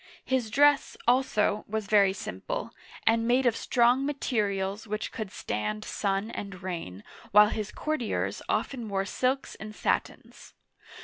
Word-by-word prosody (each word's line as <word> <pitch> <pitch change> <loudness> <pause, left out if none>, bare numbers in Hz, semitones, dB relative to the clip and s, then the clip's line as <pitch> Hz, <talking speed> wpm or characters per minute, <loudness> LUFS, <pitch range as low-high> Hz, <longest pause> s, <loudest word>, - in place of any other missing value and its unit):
His 255 -4 0
dress, 285 +4 +4
also, 240 -4 +2
was 220 0 -2
very 200 -1 +5
simple, 95 - -5 0.3
and 230 0 +3
made 255 +2 +3
of 240 -2 +3
strong 245 +3 +3
ma 290 +1 0
terials 205 -5 -1
which 215 +1 -3
could 215 -3 -5
stand 105 0 -3
sun 200 +2 -1
and 195 -2 -7
rain, 165 - -5 0.3
while 210 +1 +7
his 215 -1 -3
courtiers 305 -7 -2
often 240 -5 -1
wore 195 -1 0
silks 255 +7 -1
and 215 +1 -9
satins. - - -3
215 Hz, 140 wpm, -28 LUFS, 195-245 Hz, 0.3 s, while